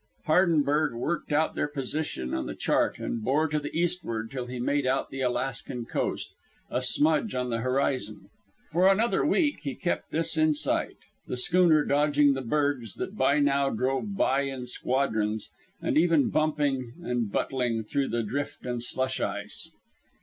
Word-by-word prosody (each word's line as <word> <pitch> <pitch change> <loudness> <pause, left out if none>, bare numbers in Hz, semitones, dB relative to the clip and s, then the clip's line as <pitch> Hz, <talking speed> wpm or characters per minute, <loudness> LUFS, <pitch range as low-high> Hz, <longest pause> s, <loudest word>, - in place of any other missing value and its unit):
Hardenberg 155 -4 +3
worked 155 +7 -3
out 155 +2 +2
their - - -1
position 140 - -3
on - - -2
the - - -5
chart - - +1
and 115 - -4
bore 145 +7 +2
to 150 0 0
the 145 0 -5
eastward 165 -11 -1
till 125 -2 -4
he 125 0 -6
made 140 +2 0
out 135 +1 0
the 135 - -5
Alaskan 125 -1 -2
coast - - -2 0.4
a 125 - 0
smudge 155 - +2
on 125 -1 -1
the 115 - 0
horizon. 130 -4 -1 0.4
For 175 +4 +4
another 215 +5 +3
week 300 -2 +2
he 140 -3 -5
kept 175 - -2
this 165 0 -1
in 155 -1 +4
sight, - - 0 0.3
the 125 - -3
schooner 165 +2 +4
dodging 145 0 +3
the 135 - -3
bergs 130 -3 -1
that 200 - -5
by 140 -4 +3
now 140 -1 +2
drove 135 - -1
by 135 +1 +2
in 135 -2 -4
squadrons, 110 -4 -1 0.3
and - - -1
even 165 -3 +3
bumping 145 -5 0
and 120 -7 -1
butling 120 -3 -1
through 135 +5 -1
drift 145 +7 -4
and 120 -1 -2
slush 130 +2 -2
ice. - - -4
140 Hz, 165 wpm, -27 LUFS, 125-155 Hz, 0.4 s, For